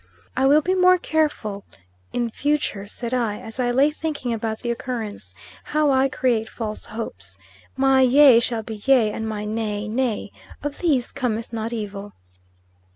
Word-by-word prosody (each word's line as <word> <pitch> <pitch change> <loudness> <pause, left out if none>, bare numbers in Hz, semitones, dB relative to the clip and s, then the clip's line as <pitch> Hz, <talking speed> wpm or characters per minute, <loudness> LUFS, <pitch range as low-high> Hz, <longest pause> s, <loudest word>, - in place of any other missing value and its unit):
"I 265 +1 +3
will 295 +3 +6
be 370 - +1
more 365 0 +5
careful 295 - -1 0.5
in 240 -1 -1
future," 285 -8 -1
said 235 +3 -5
I, 230 -5 0
as 225 +3 -8
I 245 -1 +1
lay 270 +5 +3
thinking 300 -6 -3
about 220 -1 -3
the 235 - -1
occurrence, 220 - -5 0.3
"how 300 -1 +2
I 265 0 +3
create 235 -4 0
false 215 -2 -5
hopes. 95 - -7 0.4
My 270 0 +4
yea 260 -1 +7
shall 230 -1 -2
be 220 -1 -7
yea, 245 -6 +5
and 220 +1 -4
my 210 -1 -4
nay 215 -1 -2
nay. 220 - -1 0.3
Of 290 0 -4
these 285 -9 +1
cometh 235 -4 -3
not 225 0 -3
evil." 205 -3 -5
235 Hz, 160 wpm, -23 LUFS, 215-270 Hz, 0.5 s, yea